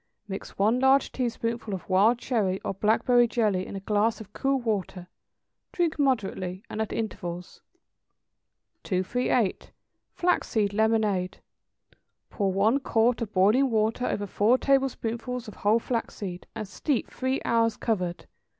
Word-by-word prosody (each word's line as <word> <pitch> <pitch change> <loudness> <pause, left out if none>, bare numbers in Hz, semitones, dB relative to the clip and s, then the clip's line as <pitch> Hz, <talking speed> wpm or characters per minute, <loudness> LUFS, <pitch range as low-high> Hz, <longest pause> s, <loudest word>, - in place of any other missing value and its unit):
= - - -50
Mix 195 -1 -7
one 215 +5 +3
large 265 +1 +4
teaspoonful 230 -3 -2
of 185 - -9
wild 200 +6 +4
cherry 210 -7 0
or - - -3
blackberry 230 +4 +3
jelly 210 -6 0
in - - -7
a - - -3
glass 210 +2 +1
of 210 -2 -12
cool 270 0 0
water; 200 -6 -3 0.7
drink 335 -3 -1
moderately, 195 -8 -1
and 220 - -3
at 220 - -3
intervals. 180 -5 -5 1.2
238. 205 +2 0 0.4
=Flaxseed 220 - +1
Lemonade.= 210 -4 +1 0.9
Pour 200 -3 0
one 215 +8 +2
quart 235 -2 +1
of 220 -3 -3
boiling 215 +9 +4
water 225 +2 +1
over 205 - -2
four 210 +5 +3
tablespoonfuls 250 -3 -1
of 215 - -10
whole 210 +2 +3
flaxseed, 205 -6 -4
and 215 -2 -5
steep 250 +7 -2
three 260 +1 -1
hours 230 -1 +2
covered. 180 -6 -2
220 Hz, 135 wpm, -27 LUFS, 195-245 Hz, 1.2 s, large